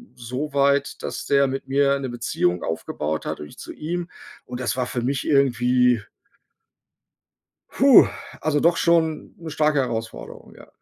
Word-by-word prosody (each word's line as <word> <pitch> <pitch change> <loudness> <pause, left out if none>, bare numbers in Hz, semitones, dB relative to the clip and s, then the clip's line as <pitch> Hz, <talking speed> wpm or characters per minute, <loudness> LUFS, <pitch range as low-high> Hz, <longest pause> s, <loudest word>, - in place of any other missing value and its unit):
so 125 +5 -5
weit, 140 0 +1
dass - - -5
der 140 0 +4
mit 135 0 -5
mir 140 0 +2
'ne 130 -2 -4
Beziehung 100 -7 -1
aufgebaut 80 -1 -3
hat - - -4
und 75 - -7
ich - - -16
zu - - -8
ihm. 175 +3 -4 0.4
Und 125 0 -7
das 125 - -1
war 125 -1 -1
für 120 - -3
mich 135 +1 -2
irgendwie 125 -3 +3 1.7
hu, - - +7 0.4
also 150 -2 +1
doch 170 +1 +3
schon 165 -2 +1
'ne 165 -2 -8
starke 150 -1 +1
Herausforderung, 115 -4 -5
ja. - - -15
135 Hz, 155 wpm, -23 LUFS, 120-150 Hz, 1.7 s, hu